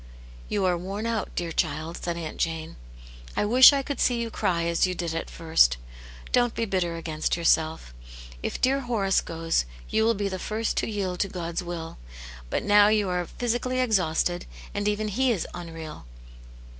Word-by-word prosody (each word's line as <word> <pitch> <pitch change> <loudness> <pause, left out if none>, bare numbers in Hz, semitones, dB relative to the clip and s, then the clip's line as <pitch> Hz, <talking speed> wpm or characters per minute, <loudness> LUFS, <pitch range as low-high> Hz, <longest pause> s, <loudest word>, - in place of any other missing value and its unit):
" - - -18
You 200 -2 0
are 180 -2 +2
worn 195 +5 -4
out, 230 -2 -1
dear 170 -1 -2
child," 160 +1 -1
said 170 -1 -3
Aunt 160 -2 -6
Jane. 160 -1 -2 0.3
" - - -16
I - - +2
wish 250 +6 +9
I 280 -1 0
could 285 0 -4
see 245 -2 +2
you 230 -1 -3
cry 170 -5 0
as 170 +2 +2
you 185 - -2
did 170 -2 -3
at 165 - -3
first.' 160 - +3 0.5
Don't 245 -1 +2
be 230 - 0
bitter 185 -4 -1
against 160 -1 -2
yourself. 160 - +1 0.5
If - - -3
dear 270 +2 +3
Horace 225 -7 +1
goes, 165 - -1 0.3
you 220 - +3
will 230 +1 +3
be 200 0 -1
the 190 -1 -4
first 220 +3 -2
to - - 0
yield 190 -4 -2
to 195 - 0
God's 170 -1 -3
wilf. 170 -2 -6 0.5
But - - -1
now 205 0 +6
you 210 -2 +2
are 180 -1 -1
physically 245 +1 -1
exhausted, 180 -7 +1 0.3
and 205 0 -1
even 210 +1 0
He 250 +5 +1
is 200 -7 -1
unreal. 165 - -8
180 Hz, 190 wpm, -26 LUFS, 165-215 Hz, 0.5 s, wish